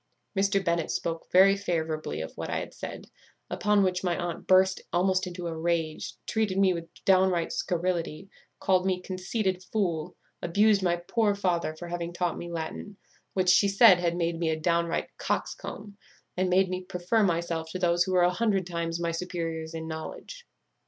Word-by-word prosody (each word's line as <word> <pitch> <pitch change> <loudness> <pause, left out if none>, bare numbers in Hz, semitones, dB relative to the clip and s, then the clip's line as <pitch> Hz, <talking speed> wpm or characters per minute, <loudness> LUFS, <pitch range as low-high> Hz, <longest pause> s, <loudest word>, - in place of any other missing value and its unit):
Mr. 195 0 +1
Bennet 170 -1 0
spoke 165 -1 -3
very 195 +2 +7
favourably 160 - -2
of 80 - -7
what - - -5
I - - -1
had - - -5
said; - - -8 0.4
upon 210 -1 +2
which 180 -1 0
my 175 -2 0
aunt 175 -2 -4
burst 190 0 +4
almost 185 +2 +2
into 175 0 -6
a 165 -1 -3
rage, 165 -1 -2
treated 215 -4 0
me 195 -1 +4
with 170 -1 -6 0.2
downright 185 -3 +3
scurrility, 175 -1 -2 0.3
called 185 -1 +2
me 185 -1 0
conceited 185 +1 -2
fool, 180 -5 -2 0.3
abused 205 +4 +3
my 175 -2 +2
poor 205 +4 0
father 175 -5 -1
for 175 +2 -8
having 170 0 -4
taught 175 -1 -1
me 175 - -6
Latin, 170 +4 -5 0.4
which, 185 -1 +2
she 185 +2 +5
said, 195 -2 +7
had 170 -1 0
made 170 -1 -1
me 165 -2 0
a 160 0 -1
downright 170 +1 0
coxcomb, 205 -1 -4 0.4
and 185 0 0
made 190 +1 +4
me 185 0 -3
prefer 180 +5 0
myself 170 -3 0
to 185 - -4
those 175 -1 +3
who 185 - -2
were 180 -1 +4
a 175 - +4
hundred 200 -3 +1
times 170 -1 -3
my 170 -1 -1
superiors 165 -2 -4
in 160 0 -5
knowledge. 165 - -7
180 Hz, 180 wpm, -28 LUFS, 170-190 Hz, 0.4 s, very